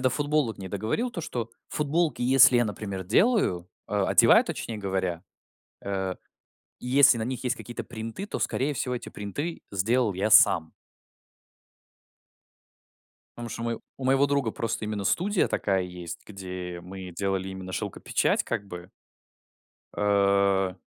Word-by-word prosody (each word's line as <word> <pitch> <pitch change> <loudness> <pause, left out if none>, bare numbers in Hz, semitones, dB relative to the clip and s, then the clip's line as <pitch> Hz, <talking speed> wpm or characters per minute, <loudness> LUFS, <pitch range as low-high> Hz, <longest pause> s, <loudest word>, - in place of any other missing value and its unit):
до 130 0 +2
футболок 145 -3 0
не 95 -1 -7
договорил, 110 - -2
то 170 - -5
что 120 -7 -4 0.2
футболки, 155 0 0
если 130 0 +6
я, 120 - +4
например, 100 -2 -5
делаю, 105 - +2 0.2
э, - - -4
одеваю, - - +6
точнее 110 -2 -5
говоря, 95 -4 -2 0.6
э, 95 -1 -2 0.6
и - - -9
если 135 -1 +6
на 110 - -2
них 130 +1 -4
есть 125 +1 0
какие-то 120 -1 -7
принты, 115 - -6
то, - - -4
скорее 140 +3 -1
всего, 125 -1 -2
эти 120 - -6
принты 145 - -5
сделал 110 +4 +1
я 100 +4 -1
сам. 85 -6 +6 2.7
Потому 120 0 -6
что 115 0 -6
у - - -3
мое 115 -1 -3 0.2
у 135 - -7
моего 135 +2 +4
друга 140 -5 0
просто 115 -1 -3
именно 105 -2 -3
студия 195 - +1
такая 95 -2 0
есть, 90 -2 -7
где 90 -3 -7
мы 95 0 -8
делали 95 -1 -1
именно 95 -1 -7
шёлкопечать, - - 0
как 110 -4 -3
бы. 90 -1 -9 1.1
Э, 100 -2 +2
110 Hz, 145 wpm, -27 LUFS, 95-130 Hz, 2.7 s, если